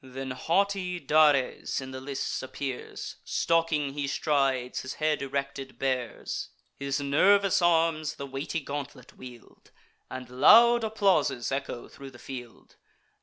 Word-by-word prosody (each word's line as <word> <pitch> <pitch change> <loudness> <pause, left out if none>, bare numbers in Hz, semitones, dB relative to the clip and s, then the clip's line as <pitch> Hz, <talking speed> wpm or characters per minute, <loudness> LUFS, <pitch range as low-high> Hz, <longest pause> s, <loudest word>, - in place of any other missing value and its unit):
Then 130 0 -6
haughty 180 +5 0
Dares 145 -3 +2
in 130 -1 -7
the 130 0 -7
lists 135 0 -3
appears; 130 0 -6
Stalking 165 -4 0
he 145 -1 -3
strides, 135 -3 0
his 130 - -6
head 155 -1 0
erected 140 -1 -4
bears: 130 -3 -3 0.3
His 140 0 -2
nervous 190 +8 +3
arms 165 -3 +2
the 140 - -6
weighty 140 +4 -4
gauntlet 140 -2 -7
wield, 125 -2 -14 0.4
And 130 -1 -7
loud 230 - +6
applauses 200 - +1
echo 135 -3 -4
thro' 135 -1 -11
the 125 - -15
field. 125 -3 -10
140 Hz, 125 wpm, -28 LUFS, 130-165 Hz, 0.4 s, loud